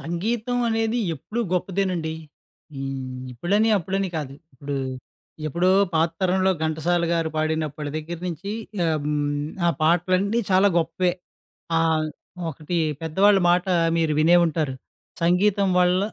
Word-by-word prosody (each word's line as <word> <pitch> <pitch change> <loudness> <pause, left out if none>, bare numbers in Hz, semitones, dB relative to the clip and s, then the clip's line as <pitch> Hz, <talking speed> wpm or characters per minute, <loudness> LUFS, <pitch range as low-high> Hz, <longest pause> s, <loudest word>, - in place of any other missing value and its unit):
సంగీతం 220 +8 -2
అనేది 225 +1 0 0.2
ఎప్పుడూ 210 - -5
గొప్పదేనండి. 180 -3 -1 0.6
హ్మ్, 135 -1 -5
ఇప్పుడని, 200 - +1
అప్పుడని 195 +2 -2
కాదు, 140 -3 -4 0.2
ఇప్పుడు 140 +2 -5 0.7
ఎప్పుడో 170 +5 +1 0.2
పాత 160 +1 +3
తరంలో 190 0 +2
ఘంటసాల 165 +2 0
గారు 165 -1 +1
పాడినప్పటి 155 -1 -2
దగ్గర 160 +2 -5
నుంచి 180 +3 -5 0.3
ఆహ్, 160 -2 +1
హ్మ్. 145 -1 -1 0.2
ఆ - - +4
పాటలన్నీ 185 +7 +2
చాలా 190 +2 +5
గొప్పే. 180 +2 0 0.7
ఆహ్, 160 -1 +2 0.4
ఒకటి 155 +3 -5 0.3
పెద్దవాళ్ళ 195 +6 +4
మాట 175 +1 +3 0.3
మీరు 160 -2 +1
వినే 170 +3 +6
ఉంటారు 155 -5 -1 0.5
సంగీతం 190 +3 +3
వల్ల 180 0 +4
170 Hz, 120 wpm, -24 LUFS, 155-190 Hz, 0.7 s, వినే